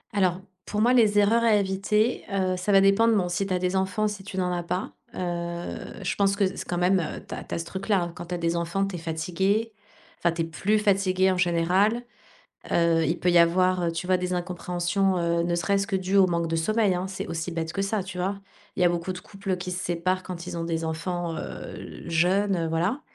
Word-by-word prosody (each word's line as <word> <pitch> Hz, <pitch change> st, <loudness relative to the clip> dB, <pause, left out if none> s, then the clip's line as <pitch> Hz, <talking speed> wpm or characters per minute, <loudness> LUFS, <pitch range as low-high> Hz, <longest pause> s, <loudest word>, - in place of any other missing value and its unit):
Alors, 185 Hz, -2 st, +2 dB, 0.3 s
pour 210 Hz, -, -2 dB
moi, 240 Hz, +3 st, +4 dB
les 220 Hz, -4 st, +4 dB
erreurs 225 Hz, +3 st, +4 dB
à 225 Hz, -2 st, +5 dB
éviter, 205 Hz, +3 st, +1 dB
heu, 190 Hz, -2 st, +1 dB
ça 180 Hz, +3 st, -1 dB
va 195 Hz, -1 st, +7 dB
dépendre, 220 Hz, +4 st, +4 dB
bon, 180 Hz, -3 st, 0 dB
si 195 Hz, +3 st, -1 dB
tu 190 Hz, -, -1 dB
as -, -, +2 dB
des 180 Hz, +1 st, -1 dB
enfants, 190 Hz, +3 st, +1 dB
si 205 Hz, -2 st, -5 dB
tu 195 Hz, -1 st, -8 dB
n'en 180 Hz, -1 st, 0 dB
as 175 Hz, -, -1 dB
pas, 180 Hz, +2 st, -3 dB, 0.2 s
heu, 170 Hz, -1 st, -4 dB
je -, -, -1 dB
pense 200 Hz, -1 st, +2 dB
que 200 Hz, -, +1 dB
s 190 Hz, -, -1 dB
quand 175 Hz, -, -2 dB
même, 180 Hz, +2 st, +3 dB
heu, 165 Hz, -, -5 dB
tu -, -, -7 dB
as -, -, -5 dB
tu -, -, -5 dB
as -, -, -2 dB
ce 165 Hz, -, -4 dB
truc-là, 195 Hz, +3 st, 0 dB
hein, 170 Hz, -, -4 dB
quand 175 Hz, -, -8 dB
tu 180 Hz, -, -3 dB
as -, -, -2 dB
des 170 Hz, 0 st, 0 dB
enfants, 170 Hz, +3 st, 0 dB
tu 195 Hz, -2 st, -5 dB
es -, -, -5 dB
fatiguée, 185 Hz, +7 st, -1 dB, 0.5 s
enfin, 170 Hz, -, +2 dB
tu 165 Hz, 0 st, -1 dB
es -, -, -2 dB
plus 195 Hz, +6 st, 0 dB
fatiguée 190 Hz, -2 st, +2 dB
en 185 Hz, -, -1 dB
général, 180 Hz, +6 st, +2 dB, 0.7 s
heu, 165 Hz, -1 st, +3 dB
il 165 Hz, +3 st, 0 dB
peut 180 Hz, -, +2 dB
y 175 Hz, -, +6 dB
avoir, 180 Hz, +2 st, +3 dB
heu, -, -, +1 dB
tu 165 Hz, +2 st, -4 dB
vois? 185 Hz, 0 st, +3 dB
Des 180 Hz, 0 st, -3 dB
incompréhensions, 180 Hz, +1 st, 0 dB
heu, 170 Hz, 0 st, +1 dB
ne 175 Hz, 0 st, 0 dB
serait-ce 200 Hz, +4 st, 0 dB
que 195 Hz, -, +1 dB
dues 190 Hz, +1 st, -1 dB
au 190 Hz, -2 st, +6 dB
manque 170 Hz, -1 st, 0 dB
de 165 Hz, -, -2 dB
sommeil, 210 Hz, +3 st, +2 dB
hein? 180 Hz, +1 st, -2 dB
C'est 190 Hz, -, -5 dB
aussi 165 Hz, +1 st, -3 dB
bête 165 Hz, -1 st, -3 dB
que 195 Hz, -, -1 dB
ça, 195 Hz, -1 st, -1 dB
tu 185 Hz, -1 st, -7 dB
vois? 195 Hz, +2 st, -1 dB, 0.4 s
Il 185 Hz, -, +1 dB
y -, -, +6 dB
a -, -, +6 dB
beaucoup 175 Hz, +1 st, -2 dB
de 180 Hz, -, -7 dB
couples 195 Hz, 0 st, -4 dB
qui 180 Hz, 0 st, -5 dB
se 180 Hz, -, -3 dB
séparent 185 Hz, +2 st, 0 dB
quand 175 Hz, -1 st, -7 dB
ils 180 Hz, -1 st, -5 dB
ont 165 Hz, -, -2 dB
des 165 Hz, -1 st, -2 dB
enfants, 170 Hz, +1 st, -3 dB
heu, -, -, -8 dB
jeunes, 185 Hz, +4 st, +2 dB
heu, 165 Hz, -1 st, -1 dB
voilà. 175 Hz, -, 0 dB
185 Hz, 250 wpm, -26 LUFS, 170-195 Hz, 0.7 s, va